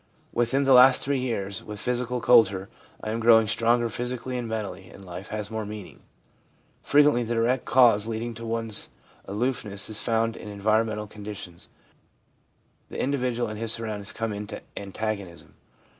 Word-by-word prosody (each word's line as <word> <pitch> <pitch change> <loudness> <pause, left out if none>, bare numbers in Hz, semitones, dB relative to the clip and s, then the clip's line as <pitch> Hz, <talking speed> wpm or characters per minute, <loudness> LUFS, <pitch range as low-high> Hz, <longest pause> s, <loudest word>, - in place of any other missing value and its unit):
Within 120 +4 +1
the 135 -1 +5
last 125 +1 +7
three 140 -1 0
years, 100 -6 -3
with 105 -1 -7
physical 125 +1 -1
culture, 100 -5 +4 0.3
I 110 - -3
am 115 - -2
growing 115 -1 +6
stronger 120 +2 +2
physically 125 +2 -4
and 120 -2 -3
mentally, 105 -4 -5
and 95 - -13
life 90 +3 -8
has 105 -1 -5
more 110 0 -3
meaning.' 105 -2 -9 0.8
Frequently 145 -3 +4
the 120 0 -2
direct 120 +3 +1
cause 115 -5 +5
leading 115 +1 -3
to 115 +1 -9
one's 115 -2 0 0.4
aloof 120 +6 -1
ness 100 0 -3
is 105 - +1
found 115 -1 0
in - - -9
environmental 105 +1 0
conditions. 100 -4 -8 1.2
The - - -7
individual 125 -3 0
and 105 0 -6
his 115 -1 -1
surroundings 105 -3 -3
come 115 -1 -3
into 105 +1 -7
antagonism. 100 -3 -5
110 Hz, 160 wpm, -26 LUFS, 105-120 Hz, 1.2 s, last